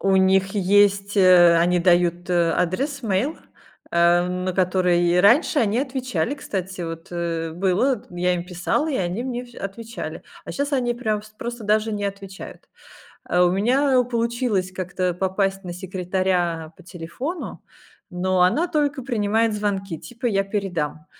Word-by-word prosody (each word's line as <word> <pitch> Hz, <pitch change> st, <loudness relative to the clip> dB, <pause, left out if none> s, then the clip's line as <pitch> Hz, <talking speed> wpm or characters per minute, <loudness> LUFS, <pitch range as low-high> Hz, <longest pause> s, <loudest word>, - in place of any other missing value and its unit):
У 195 Hz, -1 st, +2 dB
них 190 Hz, 0 st, +3 dB
есть, 200 Hz, +1 st, +3 dB
э 180 Hz, -3 st, +7 dB
они 175 Hz, +2 st, +3 dB
дают, 175 Hz, 0 st, +2 dB
э, 170 Hz, -1 st, +3 dB
адрес, 270 Hz, -, -1 dB
мейл. 220 Hz, +8 st, 0 dB, 0.6 s
Э, 170 Hz, +1 st, +4 dB
на 180 Hz, +1 st, -2 dB
который 180 Hz, -1 st, +2 dB
раньше 260 Hz, -, +4 dB
они 220 Hz, -1 st, +1 dB
отвечали, 255 Hz, -, -2 dB
кстати. 190 Hz, -8 st, -5 dB
Вот, 165 Hz, -1 st, -7 dB
э, 165 Hz, -1 st, -3 dB
было 195 Hz, +9 st, +1 dB
т 230 Hz, -, -16 dB
я 180 Hz, 0 st, 0 dB
им 175 Hz, -1 st, -4 dB
писала, 180 Hz, -, -1 dB
и 275 Hz, -, -1 dB
они 180 Hz, +5 st, -2 dB
мне 250 Hz, -1 st, -4 dB
вс 240 Hz, -1 st, -17 dB
отвечали. 225 Hz, +4 st, -7 dB, 0.2 s
А -, -, -7 dB
щас 285 Hz, +1 st, -2 dB
они 250 Hz, -3 st, +1 dB
прям 220 Hz, -3 st, -1 dB
вс 215 Hz, +1 st, -15 dB
просто 240 Hz, -1 st, -6 dB
даже 215 Hz, +1 st, +1 dB
не 205 Hz, -1 st, -3 dB
отвечают. 195 Hz, -1 st, -8 dB, 0.6 s
А, 180 Hz, 0 st, +2 dB
у 175 Hz, -, +3 dB
меня, 255 Hz, +9 st, +2 dB
э, 250 Hz, -1 st, +5 dB
получилось 235 Hz, -5 st, -1 dB
как-то 185 Hz, -1 st, -2 dB
попасть 195 Hz, +2 st, -1 dB
на 175 Hz, -, -5 dB
секретаря 180 Hz, -3 st, -2 dB
по 185 Hz, -, -16 dB
телефону. 185 Hz, -, -6 dB, 0.5 s
Но 185 Hz, +1 st, 0 dB
она 240 Hz, -, +3 dB
только 290 Hz, -5 st, -1 dB
принимает 225 Hz, -2 st, +1 dB
звонки, 195 Hz, -5 st, -2 dB
типа: 245 Hz, +7 st, -9 dB
"Я 195 Hz, -3 st, +1 dB
передам." 180 Hz, -7 st, -3 dB
195 Hz, 160 wpm, -22 LUFS, 180-230 Hz, 0.6 s, э